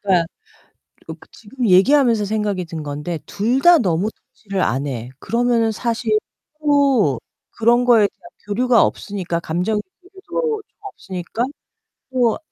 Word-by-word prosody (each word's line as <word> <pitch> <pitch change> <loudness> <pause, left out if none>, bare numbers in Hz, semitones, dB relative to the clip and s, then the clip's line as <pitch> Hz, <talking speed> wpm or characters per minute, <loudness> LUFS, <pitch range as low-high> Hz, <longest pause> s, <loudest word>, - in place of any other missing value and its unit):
그니까 190 -4 +3
으 - - -5 1.0
그 - - -18
지금 235 +1 -4
얘기하면서 230 +3 +4
생각이 205 -3 -1
든 165 -2 -6
건데 150 +3 -4
둘 235 +6 0
다 345 +1 +7
너무 185 -1 0
터치를 220 -9 -6
안 135 +4 0
해 125 -3 -5
그러면은 235 - +1
사실 225 -1 -1 0.4
또 275 - +3 0.3
그런 240 +2 +2
거에 230 -4 +5
대한 345 - -18 0.2
교류가 240 +3 +3
없으니까 180 -5 -3
감정의 180 +7 -1 0.2
교류도 425 +4 -4
좀 - - -50
없으니까 205 - -5 0.7
또 245 -3 +2
220 Hz, 285 characters per minute, -20 LUFS, 180-250 Hz, 1.0 s, 다